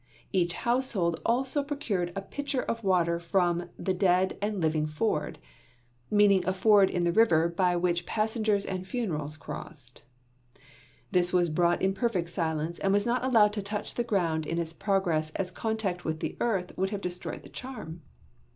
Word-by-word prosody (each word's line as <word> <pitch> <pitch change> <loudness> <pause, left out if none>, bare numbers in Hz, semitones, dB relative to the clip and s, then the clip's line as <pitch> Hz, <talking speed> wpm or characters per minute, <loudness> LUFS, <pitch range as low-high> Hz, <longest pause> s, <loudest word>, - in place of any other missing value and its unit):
Each 175 -2 +2
household 225 -9 0
also 260 +5 +1
procured 235 - -2
a 195 - -3
pitcher 285 +4 -3
of 230 0 -3
water 170 -3 +2
from 175 0 0
"the 190 - -1
dead 185 0 +2
and 205 -1 -1
living 155 -2 +1
ford," 155 +9 -1 0.7
meaning 205 -2 +5
a 185 - +2
ford 200 0 +5
in 175 - -1
the 170 - +2
river 170 -5 +4
by 180 +1 +1
which 175 0 0
passengers 215 -2 0
and 185 -1 -4
funerals 155 - -3
crossed. 140 -4 -8 1.1
This 180 0 +2
was 175 -2 +3
brought 175 +3 +2
in 190 0 +3
perfect 190 -6 -1
silence 160 -1 -2
and 195 - +1
was 205 +1 +2
not 245 +1 0
allowed 220 -5 +4
to 210 - -2
touch 205 +1 -4
the 240 - -1
ground 170 -8 0
in 165 - -2
its 165 -1 -2
progress 170 -4 0
as 185 -1 -2
contact 200 -3 -2
with 160 0 -2
the - - -3
earth 195 -7 -1
would 190 +1 0
have 205 -1 -4
destroyed 180 -1 -5
the - - -12
charm. 215 -11 -8
185 Hz, 170 wpm, -28 LUFS, 170-215 Hz, 1.1 s, meaning